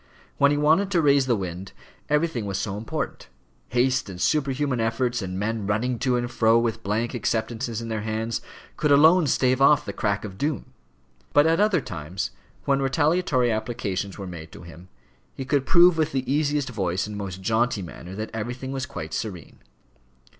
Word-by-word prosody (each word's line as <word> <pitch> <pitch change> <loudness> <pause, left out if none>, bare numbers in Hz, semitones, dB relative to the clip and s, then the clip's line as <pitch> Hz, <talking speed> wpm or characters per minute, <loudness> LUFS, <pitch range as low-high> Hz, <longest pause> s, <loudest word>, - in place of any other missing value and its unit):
When 140 - +6
he 145 - +1
wanted 160 +7 +3
to 180 -4 +2
raise 140 -2 +4
the 120 - +3
wind, 95 -1 -6 0.4
everything 150 -7 0
was 95 -1 -2
so 100 -2 -3
important; 110 +2 -5 0.4
haste 125 -2 +1
and 90 -2 -8
superhuman 140 0 0
efforts, 120 +1 0
and 95 -1 -4
men 105 0 -2
running 115 +4 0
to 125 -1 +1
and 120 0 -2
fro 115 -1 +4
with 115 -1 0
blank 110 +4 -1
acceptances 115 0 -2
in - - -6
their 110 -2 -3
hands, 110 +1 -2 0.4
could 150 - +1
alone 160 +4 +6
stave 130 0 +2
off 145 +1 +5
the - - -5
crack 100 0 -1
of 95 -2 -9
doom; 145 -3 -2 0.6
but 145 - +6
at 165 +2 +3
other 205 -6 +3
times, 85 -1 -5 0.3
when 140 0 +2
retaliatory 145 -2 +2
applications 110 -4 -3
were 100 - -6
made 85 -3 -8
to - - -11
him, 85 +2 -13 0.5
he 135 - -5
could 140 0 0
prove 175 -1 +6
with 155 0 +1
the 130 -1 -1
easiest 145 -2 0
voice 95 -5 -1
and 105 0 -7
most 95 -2 -6
jaunty 115 -1 +1
manner 90 +2 -9
that 110 +2 -5
everything 125 +4 -4
was 135 -1 -3
quite 80 0 -7
serene. 100 -6 -5
120 Hz, 180 wpm, -25 LUFS, 105-140 Hz, 0.6 s, When